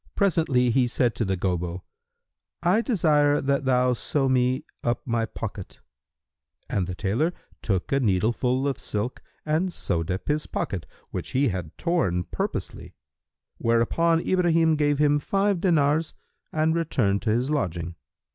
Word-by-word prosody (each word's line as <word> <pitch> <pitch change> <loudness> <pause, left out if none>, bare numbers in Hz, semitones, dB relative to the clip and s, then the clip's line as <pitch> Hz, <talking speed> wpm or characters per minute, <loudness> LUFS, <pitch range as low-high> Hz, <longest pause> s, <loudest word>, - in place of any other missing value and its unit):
Presently 160 -10 +2
he 125 +1 +3
said 120 -1 +1
to 115 - -1
the 95 -1 -1
Gobbo, 90 -1 -2 0.8
"I 185 +6 +3
desire 150 - +3
that 140 0 0
thou 125 -1 +3
sew 135 +3 -1
me 130 +2 +1 0.2
up 120 0 -1
my 115 -2 0
pocket;" - - -7 0.9
and 90 -3 -1
the 90 - -4
tailor 115 - 0 0.3
took 95 -4 -1
a 135 - +3
needleful 120 +5 +1
of 140 - -2
silk 105 +4 -3 0.2
and 160 +4 +1
sewed 85 - -2
up 95 +1 -3
his 150 +1 0
pocket 90 -5 -3 0.2
which - - -5
he 135 0 +3
had 90 -5 -5
torn 155 - 0
purposely; - - -5 0.6
whereupon 165 +9 +2
Ibrahim 165 -3 +3
gave 145 -1 +2
him 145 0 +3
five 195 +3 0
dinars 155 -3 +2 0.4
and 155 +1 +1
returned 125 -12 +1
to 115 - -1
his 120 +6 +1
lodging. 85 - -2
130 Hz, 145 wpm, -25 LUFS, 105-155 Hz, 0.9 s, he